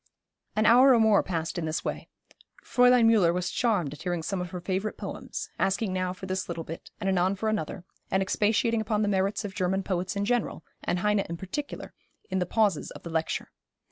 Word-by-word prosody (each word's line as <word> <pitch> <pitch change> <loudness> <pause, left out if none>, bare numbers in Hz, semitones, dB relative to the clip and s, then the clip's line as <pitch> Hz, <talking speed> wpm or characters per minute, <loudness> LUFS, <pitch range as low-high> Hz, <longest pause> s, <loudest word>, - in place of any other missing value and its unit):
An 215 +1 +2
hour 250 +3 +7
or - - +4
more 220 -2 +5
passed 165 -1 -3
in 165 - -2
this 155 0 -2
way. - - -4 0.6
Fräulein 250 -1 +5
Müller 215 -7 +5
was 180 +1 -2
charmed 200 - +1
at 150 - -11
hearing 175 -2 -2
some 190 +2 -2
of 180 - -4
her 180 0 -5
favourite 190 +4 -2
poems, - - -6
asking 195 0 +1
now 185 -1 -1
for 185 +1 -8
this 185 0 -2
little 165 -1 -3
bit, 165 +1 -8
and 200 - -3
anon 190 0 +2
for 220 +3 -1
another, 180 -3 -3 0.2
and 190 0 +2
expatiating 220 +3 +1
upon 215 0 0
the - - +1
merits 195 +1 0
of 195 - -5
German 190 0 0
poets 185 +1 -2
in 200 0 0
general, 240 -7 -1 0.2
and 175 - 0
Heine 210 0 +2
in 170 -3 -3
particular, 285 - -6 0.4
in 190 - +1
the 180 - -1
pauses 205 -5 +1
of - - -11
the 170 - -7
lecture. 160 0 -2
190 Hz, 210 wpm, -27 LUFS, 180-215 Hz, 0.6 s, hour